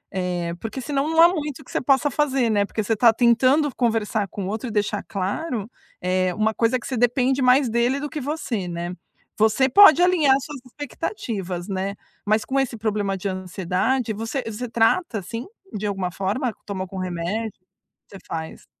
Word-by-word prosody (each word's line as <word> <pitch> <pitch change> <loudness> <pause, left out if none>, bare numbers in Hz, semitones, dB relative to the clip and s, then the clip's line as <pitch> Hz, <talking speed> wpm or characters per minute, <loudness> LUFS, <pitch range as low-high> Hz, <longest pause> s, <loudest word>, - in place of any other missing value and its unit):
Eh, 180 -2 -2
porque 225 +4 -5
senão 275 +3 -1
não 325 0 +1
há 335 - +10
muito 300 -5 -3
o - - -13
que - - -14
você - - -1
possa 275 +2 +2
fazer, 270 -4 +1
né. 205 -1 +2
Porque 215 +1 -3
você 225 +2 0
tá 230 +2 +6
tentando 255 +6 +3
conversar 220 -3 0
com 200 - -5
o - - -4
outro 220 +4 -3
e - - -6
deixar 210 -1 0
claro, 210 - -3 0.3
eh, 185 0 +1
uma 220 +1 +1
coisa 230 +3 +2
que - - -12
você 260 - -3
depende 250 +3 +2
mais 255 +1 +5
dele 240 +4 +1
do 295 - -3
que 300 - -5
você, 250 - -3
né. 175 +1 -4 0.5
Você 220 +5 +4
pode 350 +3 +8
alinhar 325 -7 +4
as 275 0 -3
suas 295 -2 -8
expectativas, 205 - -5
né. 195 0 -3 0.3
Mas 215 +1 +2
com 270 +1 0
esse 260 -4 -1
problema 205 -3 -1
de 190 - -4
ansiedade, 185 +6 -1
você 225 +5 -3
você 225 +2 -5
trata 235 +5 +2
assim 230 +6 -6 0.3
de 210 0 -2
alguma 190 -3 -2
forma? 210 +6 -2
Toma 195 -2 -4
algum 190 0 -7
remédio? 185 +5 -3 0.5
Você 195 - -11
faz? 160 -1 -6
225 Hz, 190 wpm, -23 LUFS, 195-265 Hz, 0.5 s, há